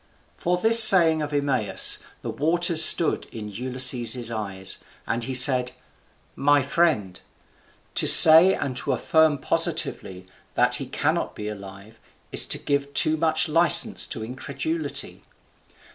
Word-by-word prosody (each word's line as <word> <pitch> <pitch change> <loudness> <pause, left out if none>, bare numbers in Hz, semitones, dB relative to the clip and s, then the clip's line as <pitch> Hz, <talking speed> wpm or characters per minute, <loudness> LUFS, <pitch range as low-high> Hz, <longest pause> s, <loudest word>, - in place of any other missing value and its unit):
For 180 +1 -3
this 225 +4 +7
saying 165 -6 +3
of 150 0 -7
Eumaeus 140 -7 0 0.2
the - - -6
waters 165 +1 0
stood 170 - 0
in 105 -2 -10
Ulysses's 125 0 0
eyes, 100 -4 -4 0.3
and 115 0 -5
he 130 - -5
said, 125 -1 +3 0.6
"My 145 0 0
friend, 140 - -3 0.7
to - - +3
say 165 +4 +8
and 135 -3 -6
to - - -3
affirm 160 -2 0
positively 95 -7 -4 0.3
that - - 0
he - - -9
cannot - - -4
be 105 - -9
alive 100 +1 -13 0.3
is - - +2
to - - -1
give 140 -1 -5
too 155 - +1
much 160 +1 -1
license 170 +6 0
to 115 -6 -7
incredulity. 315 - -7
140 Hz, 130 wpm, -21 LUFS, 115-160 Hz, 0.7 s, say